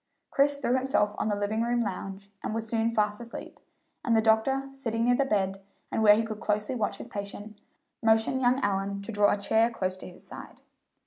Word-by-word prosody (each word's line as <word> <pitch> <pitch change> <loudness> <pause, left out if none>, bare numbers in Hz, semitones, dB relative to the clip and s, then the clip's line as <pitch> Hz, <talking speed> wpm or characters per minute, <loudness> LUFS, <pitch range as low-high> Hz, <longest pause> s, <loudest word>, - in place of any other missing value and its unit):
Chris 285 +1 +3
threw 250 - 0
himself 260 -5 +1
on - - 0
the 205 - +1
living 205 +2 -1
room 240 +1 +1
lounge, 195 -2 -4
and 215 - -3
was 225 0 -3
soon 225 0 +1
fast 210 -1 0
asleep, 235 0 -9 0.4
and 235 -5 +2
the - - +5
doctor, 230 +5 +2
sitting 230 -4 -2
near 245 +1 +4
the 275 +3 +2
bed, 195 -5 0 0.3
and - - 0
where 210 -1 +8
he 225 - +1
could 215 -1 -5
closely 210 +2 -1
watch 220 -5 -1
his - - -8
patient, 205 +1 -7 0.4
motioned 225 +3 +3
young 250 +1 +3
Allyn 200 -1 -1
to 230 - -6
draw 205 -1 +4
a - - +1
chair 220 +3 +3
close 185 -5 -2
to - - -8
his 180 - -11
side. - - -10
220 Hz, 210 wpm, -28 LUFS, 205-235 Hz, 0.4 s, where